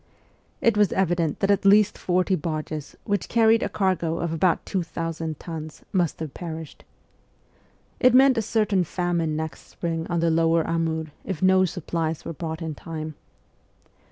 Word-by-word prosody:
It 230 -2 +3
was 210 -2 +3
evident 175 -4 0
that 195 0 +3
at 200 - +2
least 205 +1 +5
forty 185 +1 0
barges, 155 -3 -3
which 205 -1 -1
carried 225 -1 +4
a - - -1
cargo 180 -4 0
of 170 -1 -2
about 170 +2 +1
2,000 165 -3 -3
tons, 155 -2 -7
must 175 -5 +1
have 155 -4 -5
perished. 160 -3 -7 1.2
It 255 0 +5
meant 265 0 +7
a 225 - +1
certain 210 -3 +1
famine 170 -2 -1
next 160 -2 -5
spring 165 -1 -3
on 175 -1 -1
the 165 0 +2
lower 165 0 +3
Amur 160 -2 -1
if 185 -3 -4
no 185 0 +5
supplies 165 -2 -3
were - - -4
brought 160 +1 -5
in 160 -1 -3
time. 155 0 -6
170 Hz, 155 wpm, -25 LUFS, 160-190 Hz, 1.2 s, meant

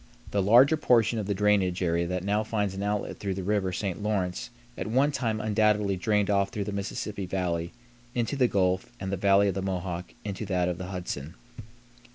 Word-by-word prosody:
The 100 - +1
larger 125 +10 +6
portion 120 -5 +3
of 100 - -3
the 100 - 0
drainage 95 -2 +2
area 85 0 +1
that 90 0 -2
now 105 +2 +1
finds 105 -3 -1
an 95 - -5
outlet 105 0 -2
through 100 -2 -2
the 95 - -4
River 100 -1 0
St. 95 0 -3
Lawrence 100 -4 -1 0.3
at - - -4
one 135 +6 +3
time 115 -6 -1
undoubtedly 105 -2 +2
drained 105 +2 +1
off 100 -1 +2
through 105 -4 -3
the 105 - -4
Mississippi 100 0 -4
Valley 85 -2 -2 0.4
into 120 +3 0
the 130 -3 +3
Gulf 95 -2 0
and 95 0 -4
the - - +1
Valley 100 +1 +4
of - - -1
the 95 - -3
Mohawk 90 -2 -4
into 100 +1 -4
that 90 -2 +1
of 90 0 -2
the 90 - -5
Hudson. 90 -5 -5
100 Hz, 205 wpm, -27 LUFS, 90-105 Hz, 0.4 s, larger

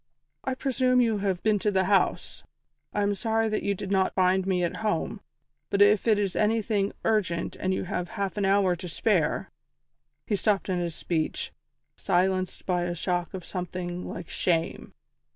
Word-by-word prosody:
"I 265 - -1
presume 255 -1 +2
you 225 -4 +2
have 195 -3 -1
been 215 -1 +3
to 210 - +1
the 190 -2 +2
house. 195 +1 +1 0.5
I 205 - 0
am 200 0 +2
sorry 225 +1 0
that 215 - -1
you 200 - 0
did 195 +1 -6
not 190 -1 +2
find 185 0 +3
me 180 -2 +1
at 170 - -1
home, 215 -1 -1 0.5
but 200 - 0
if 205 +2 +5
it 215 -2 +5
is 200 -3 -1
anything 210 -2 +1
urgent 185 -7 0
and 185 - -1
you 190 - -1
have 180 0 -3
half 200 -1 -3
an 205 - -1
hour 195 -2 +3
to 180 +1 -7
spare 170 -3 +1 0.4
" - - -53
He 210 - 0
stopped 200 -1 +1
in 180 -1 0
his 170 -2 -3
speech, 160 -3 -2 0.4
silenced 185 +1 0
by 180 -2 0
a 175 0 -2
shock 175 0 -2
of 185 - -7
something 180 -1 -4
like 170 -2 -6
shame. 165 -2 -1
190 Hz, 185 wpm, -27 LUFS, 180-210 Hz, 0.5 s, if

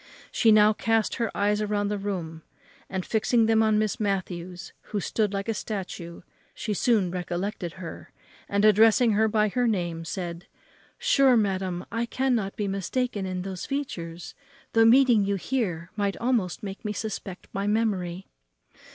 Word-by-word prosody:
She 225 - +4
now 215 0 +6
cast 225 0 0
her 230 -2 0
eyes 210 +1 +1
round 205 -1 -1
the 205 - -2
room, 175 -5 -4 0.5
and, 190 -2 -3
fixing 225 +1 +2
them 225 0 +4
on 215 -1 +3
Miss 215 -1 0
Matthews, 185 -3 -3
who 210 - -3
stood 210 +2 0
like 200 +1 -3
a 225 - 0
statue, 190 -5 -6 0.3
she 215 - -3
soon 205 -4 +2
recollected 180 0 -3
her, 180 -3 -9 0.4
and, 200 +1 +2
addressing 220 +3 +5
her 215 +1 +3
by 215 -1 +2
her 245 +4 +1
name, 175 -6 -1
said, 175 0 -5 0.5
"Sure, 275 - +4
madam, 190 -4 -1
I 230 +2 -1
cannot 240 -7 0
be 205 - -2
mistaken 195 +2 -2
in 185 -1 -3
those 190 -2 -5
features; 175 -12 -5 0.4
though 225 0 +5
meeting 240 -2 +6
you 200 0 0
here 185 -6 -2
might 200 -2 -1
almost 235 -6 0
make 195 +1 -6
me 210 -1 -2
suspect 195 -3 -6
my 195 +1 -2
memory." 195 -5 0
205 Hz, 160 wpm, -26 LUFS, 185-225 Hz, 0.5 s, now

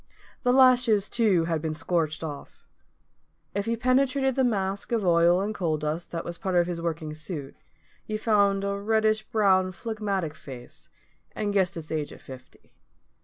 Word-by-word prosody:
The 245 - +2
lashes, 250 -5 +5
too, 200 -8 +2
had 165 -2 -1
been 155 -1 -3
scorched 160 -2 -1
off. 145 -3 -8 0.9
If 200 +2 -2
you 230 0 0
penetrated 265 +2 +2
the 265 - +1
mask 200 -4 -1
of 225 -4 0
oil 170 +1 +4
and 210 +2 -2
coal 165 -6 -1
dust 155 +3 -3
that 165 -1 -5
was 170 -1 -5
part 190 -2 -2
of 175 -1 +4
his 170 -1 -4
working 160 -2 -3
suit, 155 -3 -7 0.5
you 215 - -2
found 200 -3 +2
a 200 0 -2
reddish 215 +1 +2
brown 195 -4 +2
phlegmatic 200 -5 -3
face, 135 -4 -12 0.5
and 205 -1 -2
guessed 190 -2 +1
its 160 -1 -8
age 155 -2 -2
at - - -12
fifty. 130 -1 -14
190 Hz, 170 wpm, -26 LUFS, 165-215 Hz, 0.9 s, lashes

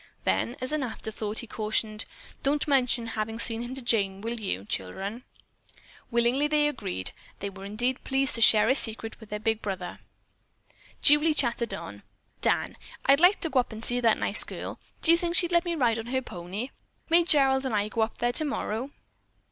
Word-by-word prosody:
Then, 240 - 0
as 255 +2 -4
an 305 -1 -1
afterthought, 220 -3 -5
he - - -5
cautioned, 215 0 -2 0.4
"Don't 290 +2 0
mention 250 -4 +2
having 225 0 -4
seen 230 0 +3
him 240 +2 -6
to 270 - -5
Jane, 200 -5 +1
will 230 +2 -4
you, 100 - -4
children?" 195 - -4 0.9
Willingly 240 +5 +2
they 300 0 +2
agreed. 95 - -4 0.3
They 200 0 -5
were 195 0 -10
indeed 240 +6 -2
pleased 270 0 0
to 230 - -2
share 215 -1 +6
a 260 - +5
secret 225 -4 +3
with 220 -2 -14
their 210 - -3
big 220 +1 -1
brother. 190 -3 -5 1.0
Julie 300 +2 +5
chattered 235 -3 0
on, - - -9 0.4
"Dan, - - 0 0.3
I'd 275 +1 +5
like 360 +4 +5
to 325 - -1
go 260 - +3
up 245 - -1
and 220 +1 -7
see 245 0 +1
that 230 -3 +3
nice - - +5
girl. - - -7 0.2
Do 330 - +6
you 335 - +6
think 340 0 -2
she'd 350 -1 +2
let 340 +1 +3
me 345 -1 -1
ride 235 -6 +1
on 225 - -7
her 260 +1 -1
pony? 190 +6 -6 0.4
May 340 +1 +6
Gerald 270 -4 +4
and 235 - -2
I 205 0 +1
go 225 +1 -2
up 220 0 -1
there 240 0 0
tomorrow?" 275 -5 -1
235 Hz, 195 wpm, -27 LUFS, 215-275 Hz, 1.0 s, share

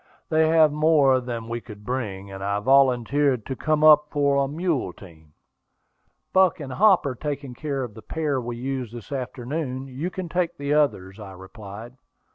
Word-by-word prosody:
"They 160 0 +3
have 160 -1 +5
more 150 -3 +4
than 120 -2 -5
we 120 0 -4
could 105 -3 -12
bring, 100 -6 -4
and 95 0 -7
I 100 +1 -1
volunteered 130 +1 +3
to 130 - -4
come 155 +2 0
up 150 -1 +7
for 140 -1 +1
a - - -1
mule 150 - -2
team." 80 -5 -16 1.0
"Buck 185 -3 +4
and 135 -4 -6
Hop 195 0 +4
are 140 - -1
taking 140 0 -5
care 140 0 -3
of 120 -4 -7
the 110 - -11
pair 145 +1 -2
we 120 0 -5
used 125 -2 -4
this 120 +3 -10
afternoon; 130 +1 -4
you 135 +7 -4
can 185 -1 -6
take 175 0 -1
the 140 +1 -1
others," 105 -10 0
I 100 -2 -9
replied. 105 +5 -11
130 Hz, 180 wpm, -24 LUFS, 115-150 Hz, 1.0 s, up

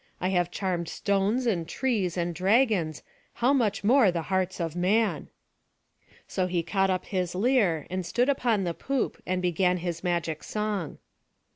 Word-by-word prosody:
I 185 - 0
have 175 -2 +1
charmed 175 -3 -2
stones, 200 +7 0
and 175 -8 0
trees, 210 -10 -1
and 175 0 -1
dragons, 190 - +2 0.3
how 250 +4 +2
much 230 -8 +1
more 235 0 +5
the 170 -2 -2
hearts 190 0 0
of 165 -1 -3
man!" 205 +5 +1 1.0
So 185 -1 -1
he 175 -2 -1
caught 195 +2 +1
up 185 -1 -1
his 180 -3 -2
lyre, 195 - +2
and 185 +1 -3
stood 240 +9 +1
upon 240 -7 +1
the 170 -2 -1
poop, 270 +7 -2
and 185 0 -1
began 180 +1 +2
his 170 -1 -4
magic 170 -3 -1
song. 210 -7 -3
185 Hz, 160 wpm, -27 LUFS, 175-215 Hz, 1.0 s, more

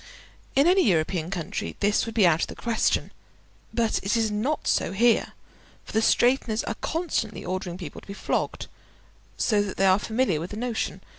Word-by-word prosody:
In 275 +2 +5
any 370 +2 +5
European 165 0 0
country 165 - -4
this 205 +2 +2
would 225 - -6
be 210 -5 +5
out 165 -1 +4
of - - 0
the - - -9
question; 230 -2 0 0.6
but 230 -2 +1
it 200 +4 0
is 220 -2 +1
not 250 +9 -1
so - - +2
there, 235 +4 +3 0.5
for - - -10
the 220 - +2
straighteners 240 -1 +2
are - - -3
constantly 315 - -2
ordering 180 -1 -3
people 170 -6 -8
to - - -19
be 200 - -7
flogged, - - -2 0.7
so 210 -3 +2
that 205 -2 -4
they 195 - +3
are 190 +1 +5
familiar 220 -6 0
with 170 +3 -5
the 210 - -7
notion. 240 -1 -3
210 Hz, 190 wpm, -25 LUFS, 185-235 Hz, 0.7 s, In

